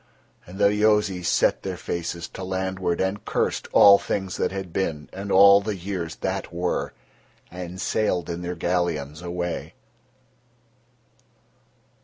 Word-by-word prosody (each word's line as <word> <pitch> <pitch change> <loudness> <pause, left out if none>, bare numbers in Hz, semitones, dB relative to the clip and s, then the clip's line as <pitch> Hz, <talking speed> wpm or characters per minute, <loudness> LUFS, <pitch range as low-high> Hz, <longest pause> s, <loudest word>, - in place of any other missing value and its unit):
And 90 +2 -10
the 100 0 +4
Yozis 105 -4 +2
set - - +2
their 95 -2 -4
faces 85 0 -4
to 95 - -8
landward, 95 -1 -2
and 95 +2 -1
cursed - - -1
all 100 0 +8
things 95 -2 -3
that - - 0
had 95 -3 -6
been 80 -6 -2
and 100 +1 -5
all 100 +1 +7
the 105 0 -3
years 90 -3 -5
that - - -3
were, 90 +1 -2 0.6
and 90 +1 -7
sailed 95 -4 0
in 85 0 -4
their 90 0 -4
galleons 85 -4 -2
away. 85 0 -4
90 Hz, 135 wpm, -24 LUFS, 85-100 Hz, 0.6 s, all